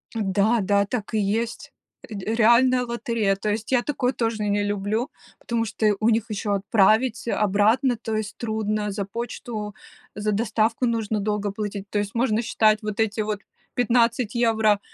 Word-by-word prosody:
Да, 210 +2 +2
да, 200 +1 +2
так 215 +1 -4
и 215 - +2
есть. 220 +3 -2 0.4
Ре 210 +1 -3
реальная 245 +3 +4
лотерея. 230 -4 -1
То 210 +2 -3
есть 215 +2 -3
я 255 -2 +4
такое 260 -2 -1
тоже 225 -4 -2
не 205 0 +1
люблю, 205 +5 -1 0.3
потому 230 -1 -1
что 215 -1 +1
у 220 - +3
них 230 0 +1
ещё 210 -1 -2
отправить 215 +4 +2
обратно, 215 +5 +2
то 225 -1 -4
есть 215 -1 -4
трудно, 215 -2 -2
за 200 0 -3
почту, 215 0 -5 0.4
за 210 +1 -1
доставку 225 +3 +1
нужно 225 -3 -1
долго 210 0 -1
платить. 205 -1 -5
То 205 - -1
есть 200 -1 -3
можно 230 -2 +1
считать, 215 -2 +2
вот 215 0 -4
эти 220 0 +1
вот 210 -1 -2 0.4
15 240 -1 +2
евро, 220 -3 +3
215 Hz, 165 wpm, -24 LUFS, 205-230 Hz, 0.4 s, реальная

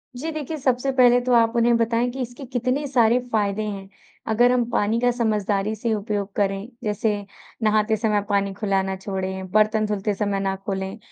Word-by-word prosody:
जी। 315 +6 -4
देखिए, 310 0 -4
सबसे 260 0 0
पहले 245 -1 +6
तो 250 0 0
आप 230 0 +4
उन्हें 235 0 +4
बताएँ 230 +1 +1
कि 265 +1 -5
इसके 245 +2 -6
कितने 255 +3 -1
सारे 240 -3 +3
फ़ायदे 210 -1 0
हैं। 195 -2 -6 0.4
अगर 240 +3 +4
हम 250 -1 +2
पानी 220 0 +1
का 245 +1 +3
समझदारी 215 -3 0
से 220 +1 -1
उपयोग 205 -1 -2
करें 195 +1 -1 0.2
जैसे 210 +1 0 0.5
नहाते 215 0 +2
समय 210 -1 +1
पानी 200 -1 +1
खुला 195 -1 0
ना 190 0 -3
छोड़ें, 190 -1 -4
बर्तन 215 +1 +3
धुलते 210 0 -1
समय 200 -1 -1
ना 195 0 -1
खोलें। 190 +1 -3
215 Hz, 185 wpm, -23 LUFS, 200-240 Hz, 0.5 s, पहले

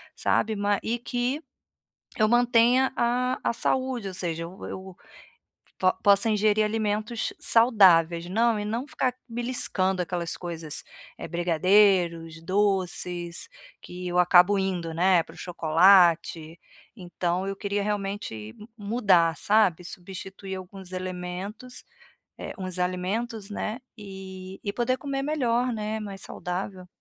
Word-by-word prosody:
sabe, 220 0 +1
ma 205 0 +1
e 235 +2 -1
que 245 +4 -2 0.8
eu 215 - +4
mantenha 245 +2 +4
a 250 +2 +1
a - - +2
saúde, 255 -2 -1
ou 185 - -8
seja, 165 -2 -3
eu 175 +3 -10
eu 190 -1 -8 0.8
po 185 0 +4
possa 200 +2 +5
ingerir 215 0 +2
alimentos 215 +1 -2
saudáveis, 180 -8 +4
não 225 +2 +2
e 205 - -3
não 230 +6 -3
ficar 265 -5 -1
beliscando 230 -6 -1
aquelas 175 -1 -3
coisas, 165 -4 -6 0.3
eh, - - -7
brigadeiros, 175 -1 +2
doces, 180 - -1 0.3
que 180 0 -8
eu 180 0 +1
acabo 180 +3 +5
indo, 180 -4 -2
né, 175 +1 +3
para - - -15
o - - -16
chocolate, 170 -1 +3 0.4
então 180 -1 -3
eu 195 - -3
queria 200 0 -2
realmente 205 - -3 0.2
m 210 - -12
mudar, 200 -6 +2
sabe. 200 -5 +2
Substituir 190 +2 -8
alguns 185 0 -10
elementos, 185 +6 -6 0.6
eh, - - -6
uns 185 -1 -5
alimentos, 195 +5 -2
né, 215 +3 -4 0.2
e 190 -2 -9
e 200 - -3
poder 245 +3 0
comer 275 0 -3
melhor, 250 -4 0
né, 215 0 -3
mais 200 -2 -7
saudável. 180 +1 -5
195 Hz, 130 wpm, -26 LUFS, 180-225 Hz, 0.8 s, possa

